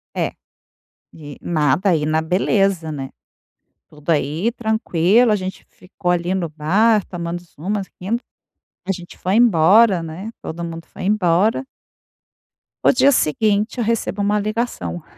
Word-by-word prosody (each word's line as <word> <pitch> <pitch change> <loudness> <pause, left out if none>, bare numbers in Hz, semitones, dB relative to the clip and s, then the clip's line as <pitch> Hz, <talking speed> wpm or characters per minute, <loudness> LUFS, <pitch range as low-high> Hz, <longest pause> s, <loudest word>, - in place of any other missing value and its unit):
É, - - -1 0.8
e 145 -3 -11
nada 160 +3 +1
aí, 160 -4 +1
na 155 +1 +1
beleza, 180 0 +1
né, 135 -3 -5 0.8
tudo 150 +1 -6
aí 160 - 0
tranquilo. 220 -1 +2
A - - +3
gente 190 -1 -6
ficou 180 0 -5
ali 175 +1 0
no 180 -3 -1
bar 195 +8 +2
tomando 175 -1 -5 0.2
umas, 195 +5 -2
rindo. 215 +6 -1 0.7
A - - +2
gente 175 -2 -8
foi 185 +2 -1
embora, 205 -2 +5
né, 170 +7 -7
todo 170 +2 -6
mundo 165 0 -6
foi - - -10
embora. 200 +3 +2 1.2
O - - +7
dia 270 +2 +5
seguinte 215 - +1
eu 240 - 0
recebo 220 -2 -1
uma 205 +1 +1
ligação. 210 - -3
185 Hz, 140 wpm, -20 LUFS, 160-215 Hz, 1.2 s, O